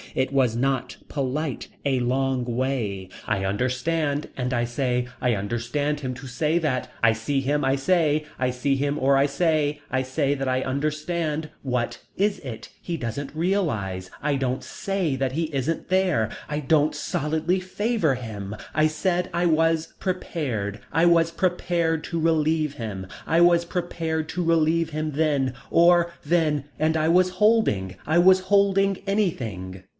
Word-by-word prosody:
It 130 +1 0
was 125 -4 +2
not 135 +1 -1
polite. 140 0 -2 0.2
A 135 -2 +2
long 130 +1 0
way. 120 -6 -2 0.2
I 100 -3 0
understand 140 +8 0
and 125 -1 -1
I 120 -1 +1
say, 125 0 -1
I 125 -1 +2
understand 120 +8 -2
him 130 -2 -3
to 130 +2 -9
say 150 +6 0
that, 140 -6 -1
I 115 -1 +5
see 115 +6 -1
him 145 +2 0
I 135 +1 +3
say 155 0 +2
I 130 0 +1
see 135 +3 0
him 145 +2 -1
or 135 +1 +4
I 135 - +4
say, 150 0 +1
I 130 - +1
say 135 +2 0
that 135 -1 -3
I 130 0 +1
understand. 155 +3 -2
What 125 -3 -2 0.2
is 200 0 +1
it. 115 -5 -8
He 170 -2 -3
doesn't 135 +2 -4
realise. 115 - -1
I 145 -1 +1
don't 130 -1 -1
say 190 -7 -2
that 135 -1 -1
he 160 +5 -1
isn't 140 +4 -1
there 185 - +2 0.2
I 150 0 -1
don't 150 +1 +2
solidly 160 +5 -1
favor 185 - 0
him. 105 -5 -6 0.2
I 155 +1 +4
said 175 +3 -1
I 175 +1 +1
was 165 0 +2
prepared. 130 - -3
I 165 +1 +3
was 165 -1 +4
prepared 170 -2 0
to 170 - -3
relieve 155 -2 +2
him. 100 -6 -6 0.2
I 165 - +2
was 170 0 +5
prepared 165 -2 -2
to 180 - -2
relieve 165 0 +2
him 155 0 -3
then 140 -3 +1 0.2
or 170 0 +5
then 150 -3 +1
and 160 +1 +1
I 155 0 +1
was 180 +2 +4
holding, 185 - +2
I 160 +2 +2
was 185 +2 +7
holding 195 0 +3
anything. 110 - -2
150 Hz, 160 wpm, -24 LUFS, 130-165 Hz, 0.2 s, was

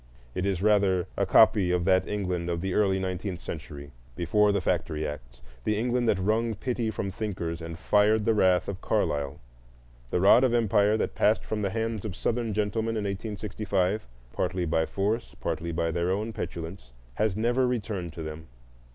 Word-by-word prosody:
It 90 +2 -1
is, 95 -1 -1
rather, 100 -4 +3
a - - 0
copy 110 -4 +5
of 90 -1 +1
that 95 -1 +3
England 90 -4 -2
of 85 -1 -1
the 95 0 -2
early 95 -2 +3
nineteenth 95 -1 -3
century, 70 -2 -8 0.2
before 105 +6 +3
the 100 - +1
factory 80 -4 -1
acts,—the 60 - -5
England 120 +1 +1
that 100 - +3
wrung 110 +4 0
pity 120 +1 -2
from 100 -2 -3
thinkers 90 -5 -4
and 80 0 -6
fired 105 +4 +3
the 115 - +4
wrath 95 -4 +3
of 100 -2 -5
Carlyle. 70 -1 -1 0.7
The 90 - 0
rod 100 +7 +6
of 125 -2 +3
empire 105 -2 +3
that - - -1
passed 110 +1 +2
from 110 -1 -3
the 100 - 0
hands 110 0 -2
of 100 -4 -5
Southern 115 +1 -1
gentlemen 110 +2 -1
in 105 - -1
1865, 100 -1 -2 0.3
partly 90 0 -1
by 80 0 +1
force, 105 +4 -2
partly 85 +1 -3
by 85 0 0
their 85 +1 0
own 105 +4 -1
petulance, 80 - -6 0.2
has 105 - 0
never 120 +3 +2
returned 105 -8 -3
to 80 - -6
them. 80 0 -7
95 Hz, 175 wpm, -27 LUFS, 85-110 Hz, 0.7 s, rod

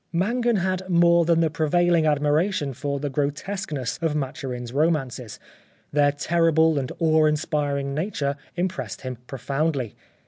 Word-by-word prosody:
Mangan 235 +7 +1
had 185 0 -1
more 170 -1 +5
than 165 0 +3
the 160 -2 +1
prevailing 165 +1 +2
admiration 150 +1 +1
for 140 +2 -3
the 145 0 -3
grotesqueness 145 - -3
of 160 -2 0
Maturin' 130 -3 -4
s 120 - -8
romances; 135 -6 -1 0.5
their 145 -1 +3
terrible 160 +1 +2
and 130 - -4
awe 160 -1 +3
inspiring 145 -2 0
nature 150 -3 -2 0.2
impressed 155 - -3
him 130 -1 -5
profoundly. 135 -2 -2
150 Hz, 135 wpm, -24 LUFS, 140-170 Hz, 0.5 s, more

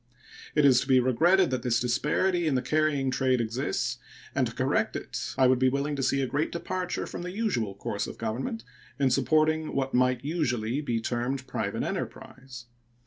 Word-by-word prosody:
It 150 -1 +4
is 130 -2 +6
to - - -5
be 130 -2 +5
regretted 170 +9 +3
that 130 - -1
this 120 -1 +1
disparity 150 +9 +1
in 145 - +1
the 130 - 0
carrying 145 -1 +1
trade 130 -1 +1
exists, 120 +1 -2 0.3
and 130 -2 +1
to 115 - -8
correct 130 -4 0
it 120 0 -5
I 130 - +5
would 130 0 +4
be 130 0 +4
willing 140 +2 -1
to 140 - -3
see 135 +1 +1
a - - +1
great 145 +5 -1
departure 180 +1 -3
from - - -7
the 180 - -5
usual 180 - -1
course - - -3
of - - -8
Government 115 0 -3 0.3
in 135 -2 +2
supporting 155 +4 +2
what 135 -1 -1
might 125 0 +2
usually 130 -5 -1
be 120 -6 -1
termed 125 +3 -2
private - - -3
enterprise. 130 -2 -6
130 Hz, 190 wpm, -28 LUFS, 125-150 Hz, 0.3 s, is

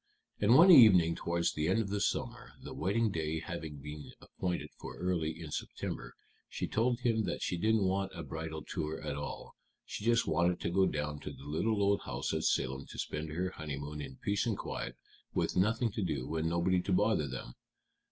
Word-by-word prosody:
And 105 +4 +5
one 175 +7 +9
evening 95 - +8
towards 85 0 0
the 75 +1 -1
end 95 +5 +3
of 105 -3 -1
the 100 0 -1
summer, - - -2
the - - -7
wedding 105 +5 +1
day 80 -1 -2
having 80 -2 -6
been 75 +1 -8
appointed 90 -1 -4
for - - -8
early 85 -3 -1
in 80 -3 -7
September, - - -5 0.3
she - - -3
told 120 +2 +1
him 115 -3 +1
that 90 - -3
she - - -1
didn't 110 +4 +2
want 95 +1 0
a 85 - -5
bridal 80 -1 -5
tour 80 0 -3
at 75 -2 -4
all; 75 0 -6 0.3
she - - -6
just 115 0 +3
wanted 85 +3 +2
to 85 - -1
go 95 +1 +4
down 75 0 -2
to - - -6
the - - -12
little 90 +9 0
old 100 0 +3
house - - -3
at - - -1
Salem 65 +1 0
to - - -10
spend 75 +1 -3
her 90 +4 -2
honeymoon 75 -1 -5
in 65 -2 -7
peace 100 - -1
and 110 -4 0
quiet, - - -5 0.4
with - - 0
nothing 110 +5 +2
to 105 - -3
do 75 -4 -2
and 80 0 0
nobody 90 +2 +2
to 95 - -3
bother 100 -5 +3
them. 60 -2 -6
85 Hz, 200 wpm, -32 LUFS, 75-100 Hz, 0.4 s, one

